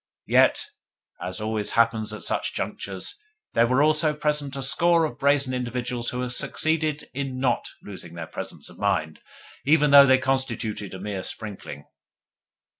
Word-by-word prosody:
Yet, - - +4 0.6
as 90 +1 -4
always 110 -1 -2
happens 115 -2 +2
at 105 - -7
such - - -1
junctures, 410 - -4 0.3
there 115 - +4
were 130 +4 +3
also 155 0 +3
present 150 -2 -1
a 135 - -3
score 170 +5 +3
of 120 -6 -6
brazen 140 -2 +2
individuals 125 -1 -2
who 125 - -3
had 125 -1 -3
succeeded 155 +3 0
in 135 -1 -4
NOT 130 -2 0 0.2
losing 90 -4 -10
their 85 -1 -5
presence - - -8
of - - -15
mind, 90 -6 0 0.4
even 150 0 +4
though 140 -1 +9
they 130 0 +6
constituted 120 -7 -2
a - - -8
mere 100 -1 -4
sprinkling. 95 -9 -5
125 Hz, 155 wpm, -25 LUFS, 110-145 Hz, 0.6 s, though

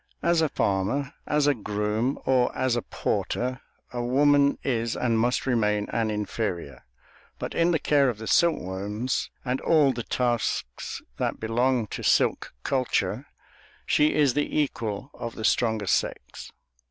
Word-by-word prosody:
As 170 -1 +3
a 160 - +2
farmer, 105 +10 0
as 150 -1 +2
a 145 - +4
groom, 105 +3 -1
or 125 -2 +3
as 130 -2 +1
a 120 - 0
porter, 125 +3 -2 0.3
a 120 -1 -2
woman 140 +3 +4
is 115 -3 -1
and 115 -3 +1
must 120 +2 +1
remain 105 -5 +1
an 115 -1 0
inferior, 105 - -3 0.5
but - - -5
in 170 +1 +2
the 170 - +3
care 140 -3 +3
of 115 - -3
the 110 - -7
silkworms, 105 - 0 0.2
and 125 +1 -1
all 150 -5 +4
the 120 - -4
tasks 120 - -2
that - - -2
belong 120 +2 +1
to - - -5
silk - - +2
culture, 130 -2 0 0.6
she 150 +1 +3
is 145 -4 +3
the 145 +1 0
equal 120 -3 -2
of 115 -1 -6
the 110 - -4
stronger 110 -3 +2
sex. - - -2
125 Hz, 150 wpm, -26 LUFS, 110-140 Hz, 0.6 s, a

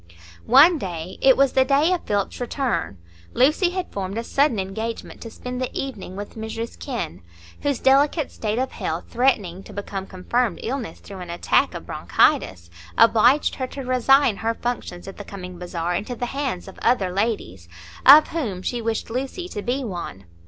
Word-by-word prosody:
One 300 +7 +7
day—it 185 +8 +1
was 275 -1 +3
the 265 - +5
day 290 +6 +3
of 360 - -3
Philip's 205 +3 -1
return—Lucy 240 - 0
had 365 0 -5
formed 195 +1 -4
a 230 - -2
sudden 275 0 +2
engagement 220 +4 -5
to 230 - -7
spend 250 +3 -6
the 255 - -2
evening 220 -9 -6
with 205 +1 -7
Mrs 225 +1 -6
Kenn, 235 - -5 0.4
whose 285 -3 0
delicate 280 +4 +3
state 215 0 -3
of 260 +1 -1
health, 160 +2 -3
threatening 210 -8 +1
to - - -13
become 195 -1 -5
confirmed 205 +3 -1
illness 255 0 -4
through 195 -1 -10
an 180 -1 -8
attack 170 +1 +1
of - - -7
bronchitis, 85 -2 +1 0.3
obliged 230 +5 +5
her 260 - -3
to 275 - -7
resign 255 -2 +3
her 230 +1 -1
functions 230 -8 -4
at 195 - -9
the 205 - -7
coming 185 -3 -9
bazaar 175 -1 -3
into 210 +7 -3
the 245 - -3
hands 260 -8 -3
of 190 - -11
other 200 -7 +2
ladies, 180 - -2 0.3
of 295 +3 +9
whom 220 - -3
she 240 +3 -2
wished 225 0 -2
Lucy 270 +9 -3
to 210 - -5
be 255 +5 -1
one. 175 - -6
230 Hz, 175 wpm, -23 LUFS, 190-265 Hz, 0.4 s, of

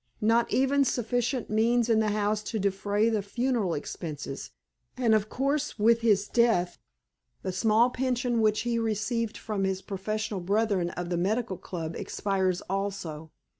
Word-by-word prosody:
Not 230 +2 +3
even 275 +2 +3
sufficient 245 0 -1
means 230 +2 +3
in 225 -2 +3
the 215 -1 +2
house 210 0 0
to 225 - -3
defray 200 +2 +1
the 220 -2 +1
funeral 225 -3 -1
expenses; 145 -2 -6 0.5
and, 235 -3 +3
of 215 -1 +2
course, 280 +2 -1
with 230 +2 +4
his 205 -3 +3
death, 225 -7 +2 0.6
the 185 - -2
small 220 +5 +3
pension 250 -2 0
which 215 -1 +2
he 235 0 0
received 225 +1 -1
from 210 -3 -3
his 190 0 -1
professional 215 +1 -3
brethren 200 -1 +1
of 175 0 -5
the 175 - +1
Medical 200 +3 0
Club 165 -2 -5
expires 190 -3 -1
also. 190 -5 -4
215 Hz, 150 wpm, -28 LUFS, 195-235 Hz, 0.6 s, with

